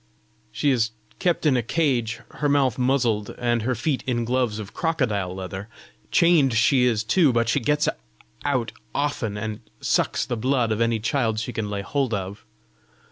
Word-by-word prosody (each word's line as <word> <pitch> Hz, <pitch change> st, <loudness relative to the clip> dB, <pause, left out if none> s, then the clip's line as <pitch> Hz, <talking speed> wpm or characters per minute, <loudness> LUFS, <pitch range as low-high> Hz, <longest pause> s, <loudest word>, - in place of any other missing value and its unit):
"She 145 Hz, -, +1 dB
is 115 Hz, -4 st, +2 dB, 0.3 s
kept 175 Hz, -2 st, +1 dB
in 145 Hz, -4 st, +4 dB
a 125 Hz, -, +2 dB
cage, 120 Hz, -3 st, 0 dB
her 145 Hz, -, -1 dB
mouth 135 Hz, -4 st, +2 dB
muzzled, 125 Hz, -5 st, +1 dB
and 120 Hz, -1 st, +1 dB
her 125 Hz, +3 st, 0 dB
feet 130 Hz, +3 st, -1 dB
in 120 Hz, -2 st, 0 dB
gloves 125 Hz, -3 st, 0 dB
of 105 Hz, -2 st, -7 dB
crocodile 110 Hz, -, -1 dB
leather. 95 Hz, +2 st, -6 dB, 0.4 s
Chained 160 Hz, -8 st, +4 dB
she 125 Hz, +3 st, +4 dB
is 115 Hz, -3 st, +1 dB
too; 145 Hz, +6 st, +4 dB
but 115 Hz, -1 st, +1 dB
she 115 Hz, +5 st, +2 dB
gets 150 Hz, +5 st, +1 dB, 0.6 s
out 130 Hz, -5 st, 0 dB, 0.2 s
often, 130 Hz, -8 st, -1 dB
and 110 Hz, 0 st, -4 dB, 0.2 s
sucks -, -, +1 dB
the 120 Hz, -, -2 dB
blood 125 Hz, -1 st, +1 dB
of 110 Hz, +1 st, 0 dB
any 115 Hz, -1 st, +2 dB
child 115 Hz, -1 st, 0 dB
she 115 Hz, +2 st, -4 dB
can 110 Hz, -2 st, -3 dB
lay 100 Hz, -1 st, -3 dB
hold 135 Hz, -2 st, 0 dB
of. 100 Hz, +1 st, -6 dB
120 Hz, 175 wpm, -24 LUFS, 110-140 Hz, 0.6 s, in